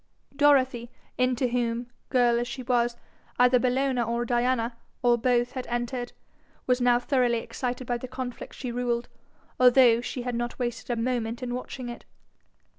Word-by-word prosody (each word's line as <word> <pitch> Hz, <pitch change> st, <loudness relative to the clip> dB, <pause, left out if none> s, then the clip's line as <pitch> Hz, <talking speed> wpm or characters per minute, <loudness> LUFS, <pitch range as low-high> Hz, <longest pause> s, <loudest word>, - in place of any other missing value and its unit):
Dorothy, 265 Hz, -4 st, +3 dB, 0.3 s
into 255 Hz, 0 st, +2 dB
whom, 235 Hz, 0 st, -1 dB, 0.2 s
girl 240 Hz, -2 st, +3 dB
as 240 Hz, -, -2 dB
she 255 Hz, +1 st, -6 dB
was, 240 Hz, -1 st, +1 dB, 0.4 s
either 250 Hz, 0 st, +5 dB
Bellona 255 Hz, 0 st, +1 dB
or 235 Hz, +1 st, -1 dB
Diana, 240 Hz, -1 st, 0 dB, 0.3 s
or 240 Hz, -1 st, +5 dB
both, 240 Hz, 0 st, +1 dB
had 255 Hz, -1 st, -5 dB
entered, 240 Hz, +1 st, -3 dB, 0.5 s
was 250 Hz, 0 st, +1 dB
now 245 Hz, -1 st, +5 dB
thoroughly 245 Hz, -1 st, +1 dB
excited 250 Hz, +2 st, -4 dB
by 240 Hz, 0 st, -1 dB
the 255 Hz, -, -6 dB
conflict 255 Hz, -1 st, -6 dB
she 250 Hz, -2 st, -5 dB
ruled, 240 Hz, 0 st, -1 dB, 0.5 s
although 250 Hz, -2 st, +6 dB
she 250 Hz, 0 st, -5 dB
had 245 Hz, 0 st, -3 dB
not 240 Hz, 0 st, -3 dB
wasted 240 Hz, -1 st, -4 dB
a 240 Hz, -1 st, -1 dB
moment 235 Hz, 0 st, -2 dB
in 245 Hz, -1 st, -3 dB
watching 255 Hz, 0 st, -5 dB
it. 240 Hz, -, -8 dB
245 Hz, 160 wpm, -27 LUFS, 240-255 Hz, 0.5 s, although